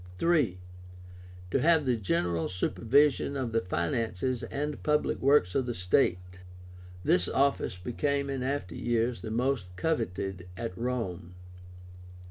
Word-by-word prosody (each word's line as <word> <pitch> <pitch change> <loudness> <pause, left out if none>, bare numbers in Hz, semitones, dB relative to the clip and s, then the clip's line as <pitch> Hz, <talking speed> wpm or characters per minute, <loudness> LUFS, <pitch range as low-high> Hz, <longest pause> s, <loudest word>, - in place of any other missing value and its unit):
III. 150 - +2 0.9
To - - +2
have 160 0 +4
the 125 -2 +2
general 85 -5 0
supervision 140 +9 +2
of 130 -4 -2
the 115 0 +1
finances 110 +7 -1
and 150 +1 -4
public 150 0 +1
works 135 -10 +4
of 130 -2 0
the 120 - -2
state. 90 0 +1 0.6
This 90 -1 +3
office 135 -8 +1
became 140 +8 -1
in 135 -2 -3
after 130 -9 -2
years 120 +4 0
the 110 - -5
most 120 -2 0
coveted 95 - -2
at 115 -3 -4
Rome. 95 -7 -3
115 Hz, 125 wpm, -29 LUFS, 90-140 Hz, 0.9 s, have